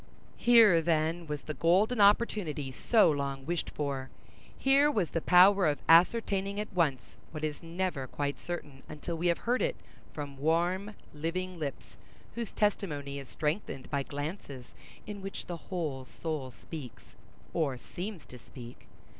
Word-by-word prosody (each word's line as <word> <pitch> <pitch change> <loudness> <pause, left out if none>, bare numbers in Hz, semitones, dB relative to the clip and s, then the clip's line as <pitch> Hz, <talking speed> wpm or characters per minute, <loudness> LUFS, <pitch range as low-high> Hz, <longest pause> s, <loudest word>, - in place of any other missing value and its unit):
Here, 225 -8 +6
then, 165 +1 0
was 150 -1 -4
the 155 - -5
golden 200 +9 +3
opportunity 200 - +2
so 210 - +4
long 140 -2 -3
wished 170 +2 -2
for! 140 -3 -3 0.5
Here 275 +2 +4
was 200 - 0
the 165 - -1
power 185 +1 +6
of 145 -1 +1
ascertaining 195 +3 +4
at 210 - -5
once 145 -10 0
what 155 -1 -7
is 150 -1 -3
never 170 -5 -3
quite 145 +2 -3
certain 145 -6 -6
until 155 +3 -5
we 170 +2 0
have 170 - +3
heard 245 +2 0
it - - +1 0.4
from 145 -2 -7
warm, 175 +7 0 0.2
living 175 +4 -3
lips, 145 -3 -6 0.4
whose 235 -2 -4
testimony 145 -9 -1
is 135 - -9
strengthened 150 -3 -3
by 140 - +1
glances 145 -2 -6 0.4
in 205 -1 -7
which 195 0 -6
the 175 - -5
whole 155 -8 -3
soul 150 -1 -4
speaks 125 +2 -10 0.4
or—seems 165 - -3
to 125 - -12
speak. 120 0 -12
165 Hz, 145 wpm, -30 LUFS, 145-195 Hz, 0.5 s, Here